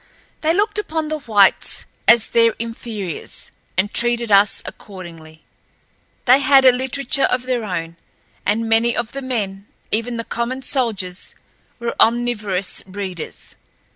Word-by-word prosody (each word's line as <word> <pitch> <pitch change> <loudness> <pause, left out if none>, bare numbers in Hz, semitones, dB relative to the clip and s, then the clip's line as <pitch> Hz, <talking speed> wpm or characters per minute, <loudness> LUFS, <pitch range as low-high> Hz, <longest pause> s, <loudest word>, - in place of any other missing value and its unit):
They 315 - +2
looked 415 +4 +1
upon 320 -6 -2
the 310 0 -2
whites 210 -8 +2 0.2
as 235 -2 +6
their 230 -1 +4
inferiors, 225 -6 -4 0.3
and 205 +3 +1
treated 235 -1 +1
us 200 +1 +4
accordingly. 165 -5 -11 0.8
They 255 +2 +6
had 275 -1 +5
a 255 - +9
literature 265 +2 0
of 250 0 0
their 250 -2 -1
own, 170 -4 -4 0.5
and 225 +2 0
many 225 +1 +2
of 240 -1 -2
the 275 - -5
men, 205 -6 -3 0.2
even 230 +2 -1
the 230 - -3
common 245 +3 -3
soldiers, 210 -10 -3 0.4
were 235 -1 -3
omnivorous 220 -5 +1
readers. 190 -3 -7
230 Hz, 135 wpm, -20 LUFS, 200-255 Hz, 0.8 s, a